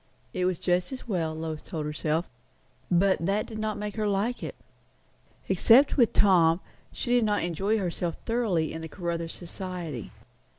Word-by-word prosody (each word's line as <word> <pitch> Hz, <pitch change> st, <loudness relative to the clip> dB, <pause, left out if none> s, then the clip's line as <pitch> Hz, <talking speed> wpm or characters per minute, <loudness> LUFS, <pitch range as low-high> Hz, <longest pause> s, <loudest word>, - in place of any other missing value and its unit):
It 180 Hz, -, 0 dB
was 185 Hz, -2 st, +1 dB
just 180 Hz, +4 st, +1 dB
as 260 Hz, -2 st, -7 dB
well, 165 Hz, -7 st, -1 dB
Lois 160 Hz, -1 st, -4 dB
told 155 Hz, -2 st, -5 dB
herself; 155 Hz, +2 st, -1 dB, 0.6 s
but 185 Hz, 0 st, +3 dB
that 200 Hz, +4 st, +1 dB
did 220 Hz, -2 st, -7 dB
not 215 Hz, -1 st, -1 dB
make 210 Hz, -1 st, -4 dB
her 215 Hz, -1 st, +1 dB
like 205 Hz, +5 st, 0 dB
it. -, -, -5 dB, 0.9 s
Except 230 Hz, +9 st, +5 dB
with 240 Hz, -5 st, +4 dB
Tom, 170 Hz, -4 st, +5 dB, 0.3 s
he 245 Hz, -, -4 dB
did 245 Hz, -1 st, +4 dB
not 210 Hz, -3 st, +1 dB
enjoy 195 Hz, +6 st, 0 dB
herself 175 Hz, -3 st, -2 dB
thoroughly 215 Hz, -9 st, 0 dB
in 160 Hz, -, -5 dB
the 160 Hz, -, -6 dB
Caruthers 170 Hz, -2 st, -3 dB
society. 175 Hz, -, -6 dB
185 Hz, 165 wpm, -28 LUFS, 165-210 Hz, 0.9 s, Except